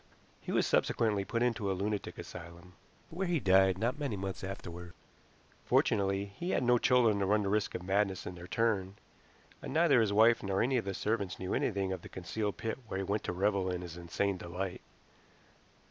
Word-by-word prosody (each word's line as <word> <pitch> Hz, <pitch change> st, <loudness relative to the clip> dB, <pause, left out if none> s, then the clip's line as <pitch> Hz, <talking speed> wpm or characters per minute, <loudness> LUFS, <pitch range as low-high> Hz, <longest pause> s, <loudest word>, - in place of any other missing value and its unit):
He -, -, -6 dB
was -, -, +2 dB
subsequently 105 Hz, -4 st, +1 dB
put 115 Hz, +5 st, -1 dB
into 115 Hz, -5 st, 0 dB
a 95 Hz, -, -2 dB
lunatic 105 Hz, +1 st, -3 dB
asylum, 85 Hz, +1 st, -10 dB, 0.4 s
where 185 Hz, +3 st, -2 dB
he 175 Hz, -2 st, +1 dB
died 95 Hz, -3 st, +4 dB
not 120 Hz, +8 st, -1 dB
many 140 Hz, -7 st, -2 dB
months 95 Hz, 0 st, -5 dB
afterward. 90 Hz, -3 st, -7 dB, 0.7 s
Fortunately 100 Hz, 0 st, +2 dB
he 100 Hz, -, -6 dB
had 130 Hz, -, +1 dB
no 120 Hz, 0 st, +4 dB
children 115 Hz, -5 st, +4 dB
to 100 Hz, -, +1 dB
run 105 Hz, +1 st, +3 dB
the 100 Hz, -, -1 dB
risk 105 Hz, -1 st, 0 dB
of 90 Hz, -, -4 dB
madness 95 Hz, 0 st, 0 dB
in -, -, -5 dB
their 85 Hz, 0 st, -10 dB
turn, 100 Hz, -4 st, 0 dB, 0.7 s
and -, -, -6 dB
neither 155 Hz, -6 st, +5 dB
his 110 Hz, -2 st, +1 dB
wife 110 Hz, +3 st, +5 dB
nor 95 Hz, 0 st, -1 dB
any 130 Hz, +2 st, +2 dB
of 115 Hz, -, -1 dB
the 100 Hz, -1 st, -3 dB
servants 100 Hz, -4 st, -1 dB
knew 95 Hz, 0 st, -3 dB
anything 100 Hz, -3 st, 0 dB
of 95 Hz, -, -6 dB
the -, -, -11 dB
concealed 100 Hz, +3 st, -3 dB
pit 115 Hz, +3 st, -3 dB
where 95 Hz, -, -4 dB
he 95 Hz, -, -1 dB
went 100 Hz, +3 st, -1 dB
to -, -, -1 dB
revel 95 Hz, +1 st, +1 dB
in 90 Hz, -1 st, -2 dB
his 85 Hz, -2 st, -8 dB
insane 90 Hz, +3 st, -1 dB
delight. 90 Hz, +1 st, -5 dB
100 Hz, 200 wpm, -32 LUFS, 95-110 Hz, 0.7 s, neither